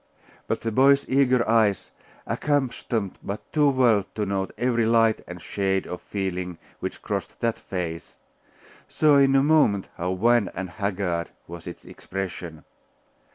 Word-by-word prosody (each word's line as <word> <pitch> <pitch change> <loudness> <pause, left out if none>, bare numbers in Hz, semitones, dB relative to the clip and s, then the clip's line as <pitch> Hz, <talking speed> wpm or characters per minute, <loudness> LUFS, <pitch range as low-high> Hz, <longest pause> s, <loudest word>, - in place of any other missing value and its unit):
But - - -1
the 115 - -2
boy's 140 +4 +4
eager 130 -3 +3
eyes, 110 -4 +2 0.3
accustomed 125 -7 -1
but 100 +2 -7
too 150 -2 +4
well 120 -6 +3
to 105 - -1
note 95 -1 -1
every 120 -2 +1
light 115 -1 +3
and 90 0 -8
shade 95 +1 -1
of 90 - -6
feeling 90 -3 -4 0.2
which - - -6
crossed - - -4
that 115 -1 0
face, 85 -3 -5 0.7
saw 150 -2 +4
in 135 -1 +5
a 135 - +5
moment 145 -11 +3
how 90 +2 -2
wan 115 +1 +3
and 95 -1 -5
haggard 95 -5 -2 0.2
was 85 0 -10
its 85 - -9
expression. 90 -4 -6
105 Hz, 145 wpm, -25 LUFS, 95-125 Hz, 0.7 s, in